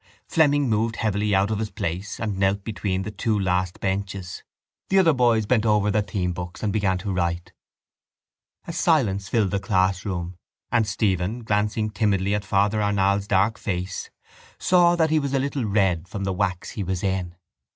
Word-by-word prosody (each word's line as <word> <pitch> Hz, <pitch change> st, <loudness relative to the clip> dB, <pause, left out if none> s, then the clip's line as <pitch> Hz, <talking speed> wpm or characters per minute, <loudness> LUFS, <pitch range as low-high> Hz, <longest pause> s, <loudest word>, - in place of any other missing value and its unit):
Fleming 145 Hz, -3 st, +3 dB
moved 110 Hz, 0 st, 0 dB
heavily 105 Hz, -2 st, 0 dB
out 100 Hz, +3 st, +2 dB
of 105 Hz, -, -1 dB
his 110 Hz, -1 st, -2 dB
place 95 Hz, -1 st, -4 dB
and 105 Hz, -4 st, -3 dB
knelt 95 Hz, +1 st, +1 dB
between 100 Hz, -3 st, -2 dB
the 105 Hz, -, -5 dB
two 110 Hz, 0 st, -1 dB
last 90 Hz, -1 st, -1 dB
benches. 95 Hz, -1 st, -3 dB, 0.5 s
The 195 Hz, -, +3 dB
other 170 Hz, -4 st, +5 dB
boys 120 Hz, -4 st, +3 dB
bent 115 Hz, 0 st, +2 dB
over 105 Hz, -2 st, +2 dB
their 105 Hz, +1 st, +2 dB
themebooks 90 Hz, -2 st, -4 dB
and 105 Hz, -2 st, 0 dB
began 100 Hz, -3 st, +1 dB
to 100 Hz, +1 st, -3 dB
write. 85 Hz, 0 st, -2 dB, 1.1 s
A 170 Hz, -, -6 dB
silence 110 Hz, -, +1 dB
filled 105 Hz, -5 st, +1 dB
the 100 Hz, -, 0 dB
classroom 95 Hz, -2 st, -1 dB, 0.3 s
and 115 Hz, -3 st, +2 dB
Stephen, 100 Hz, +2 st, -1 dB
glancing 105 Hz, 0 st, 0 dB
timidly 100 Hz, -1 st, +1 dB
at 105 Hz, 0 st, -1 dB
Father 100 Hz, +2 st, +1 dB
Arnall's 100 Hz, -1 st, +1 dB
dark 100 Hz, +3 st, +2 dB
face, 95 Hz, 0 st, -4 dB, 0.5 s
saw 175 Hz, -1 st, +4 dB
that 160 Hz, -2 st, +2 dB
it 160 Hz, -, +4 dB
was 140 Hz, -1 st, -2 dB
a -, -, +2 dB
little 140 Hz, -2 st, -2 dB
red 95 Hz, -5 st, +1 dB
from 100 Hz, +1 st, -5 dB
the 95 Hz, -1 st, -1 dB
wax 90 Hz, -1 st, -2 dB
he 105 Hz, -, -5 dB
was 95 Hz, -1 st, -3 dB
in. 95 Hz, -3 st, -2 dB
100 Hz, 175 wpm, -24 LUFS, 95-110 Hz, 1.1 s, other